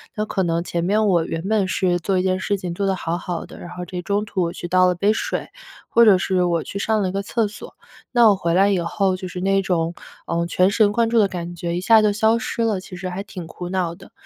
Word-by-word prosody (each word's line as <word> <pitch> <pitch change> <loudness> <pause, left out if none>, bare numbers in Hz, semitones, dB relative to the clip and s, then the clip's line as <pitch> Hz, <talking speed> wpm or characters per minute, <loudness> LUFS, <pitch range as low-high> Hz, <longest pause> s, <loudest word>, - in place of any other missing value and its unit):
那 215 - -1
可 195 -2 -1
能 170 -1 0
前 170 -1 -2
面 210 +4 +2
我 170 -4 +2
原 165 - -4
本 210 -3 +1
是 180 -2 +1
做 190 +2 0
一 - - 0
件 185 0 0
事 200 - 0
情 180 -2 -5
做 200 +3 -2
得 190 - +1
好 170 -1 -3
好 175 -1 -5
的， - - -13
然 175 - -9
后 180 - -6
这 180 -1 -5
中 200 +3 -1
途 195 -3 -2
我 170 0 -2
去 175 - -6
倒 185 +1 +4
了 180 - +2
杯 200 +4 +2
水， - - -3 0.4
或 235 0 +5
者 200 -4 +7
是 185 -1 0
我 170 -2 0
去 - - -7
上 220 +1 +1
了 190 - 0
一 - - -4
个 195 +1 -2
厕 220 +2 0
所， 215 - -11 0.4
那 240 -2 +6
我 200 - +4
回 170 -3 -1
来 195 +3 +4
以 195 -3 +1
后 185 +3 0
就 185 - -6
是 180 0 -6
那 195 +1 +2
种， 170 -3 -1 0.3
呃， 170 0 0
全 180 +2 +2
神 210 -1 +3
贯 230 +1 +2
注 235 - +1
的 205 - +4
感 175 -2 -6
觉 170 0 -3
一 180 - -2
下 220 +3 +6
就 210 -1 +3
消 220 +2 +3
失 230 - -3
了， 215 -4 0
其 185 0 -10
实 185 +1 -5
还 185 +2 -5
挺 180 -5 -8
苦 175 +1 -7
恼 180 -2 -1
的。 - - -16
185 Hz, 305 characters per minute, -21 LUFS, 175-205 Hz, 0.4 s, 者